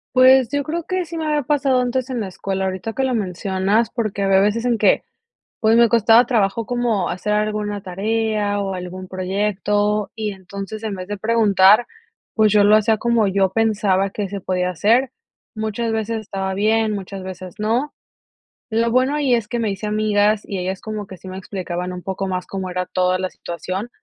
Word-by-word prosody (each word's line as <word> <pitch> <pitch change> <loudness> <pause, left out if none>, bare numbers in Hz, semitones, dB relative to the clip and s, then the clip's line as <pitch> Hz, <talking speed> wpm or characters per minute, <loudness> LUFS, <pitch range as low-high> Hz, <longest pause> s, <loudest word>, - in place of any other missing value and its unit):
Pues, 255 -1 +6
yo 285 0 0
creo 330 +2 -4
que 370 -1 -1
sí 335 0 -7
me 315 -1 -2
había 300 -2 +1
pasado 270 -2 +2
antes 255 +1 -1
en 250 -2 -2
la 200 -3 -3
escuela, 190 +1 -3
ahorita 190 +4 -3
que 270 - -1
lo 260 -1 0
mencionas, 195 +2 0
porque 215 -4 -2
había 195 0 +4
veces 210 +4 +1
en 235 -3 +1
que, 200 - +3 0.6
pues, 220 0 +3
me 235 -1 +6
costaba 230 +2 +5
trabajo 225 -2 +1
como 235 -5 0
hacer 210 +4 -2
alguna 210 -1 -1
tarea 205 +1 -1
o 195 -1 -2
algún 180 +1 -7
proyecto 205 +2 -1
y 215 -2 -3
entonces 200 +3 -8
en 210 -2 -2
vez 185 +1 -7
de 205 -1 -4
preguntar, 215 0 +4 0.5
pues, 215 -2 +3
yo 210 -1 +5
lo 210 +1 +6
hacía 215 0 +2
como 235 -2 +2
yo 190 -1 +2
pensaba 200 -3 +1
que 200 -1 -4
se 200 0 -5
podía 180 0 -1
hacer. 230 - +2 0.5
Muchas 220 +1 -2
veces 220 0 -2
estaba 195 -2 -4
bien, 215 +2 +2
muchas 195 -1 -6
veces 185 -1 -8
no. 235 +7 0 0.8
Lo 230 +1 +1
bueno 255 +4 +2
ahí 285 -4 +1
es 220 -3 -1
que 240 -2 -2
me 220 -3 0
hice 195 +2 -4
amigas 210 0 +2
y 195 - -4
ellas 185 +1 -3
como 215 -2 -5
que 190 - -10
sí 190 - -15
me 185 0 -6
explicaban 180 -2 -5
un 180 - -7
poco 190 0 -3
más 185 -1 -3
cómo 190 -1 -5
era 180 0 -2
toda 185 0 0
la 185 0 -2
situación, 185 +6 -5
210 Hz, 195 wpm, -20 LUFS, 190-230 Hz, 0.8 s, Pues